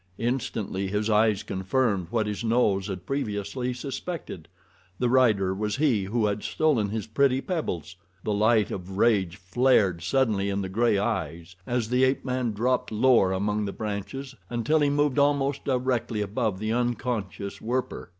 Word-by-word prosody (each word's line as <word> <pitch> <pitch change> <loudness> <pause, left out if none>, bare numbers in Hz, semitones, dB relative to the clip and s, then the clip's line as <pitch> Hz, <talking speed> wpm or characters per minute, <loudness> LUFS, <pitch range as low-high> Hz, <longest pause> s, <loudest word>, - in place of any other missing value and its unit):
Instantly 115 -5 -2
his 105 +3 -1
eyes 105 -1 +3
confirmed 95 0 0
what 110 0 0
his 105 +2 -3
nose 110 -4 +2
had 95 -3 -6
previously 125 0 -2
suspected—the 105 - -6
rider 110 -7 +3
was 105 +1 -2
he 130 -10 +2
who 110 +3 0
had 105 0 -1
stolen 130 -10 +1
his 110 0 -3
pretty 130 +3 +2
pebbles. 95 - -3 0.3
The 105 - -1
light 110 0 +3
of 95 +1 -6
rage 100 -6 +2
flared 100 -2 +2
suddenly 100 0 +1
in 100 0 -1
the 95 - -4
gray 110 +2 +2
eyes 90 -5 -3
as 120 -2 -1
the 125 +1 +3
ape 130 +1 +1
man 125 -3 -1
dropped 120 +5 0
lower 110 -4 +4
among 105 +2 0
the 100 - -3
branches 110 +6 -5 0.2
until 120 +6 +1
he 145 -1 +3
moved 145 -1 +1
almost 140 -1 +1
directly 125 -4 0
above 105 0 -1
the 110 +3 -2
unconscious 115 -5 -2
Werper. 125 -4 -3
110 Hz, 155 wpm, -26 LUFS, 100-125 Hz, 0.3 s, lower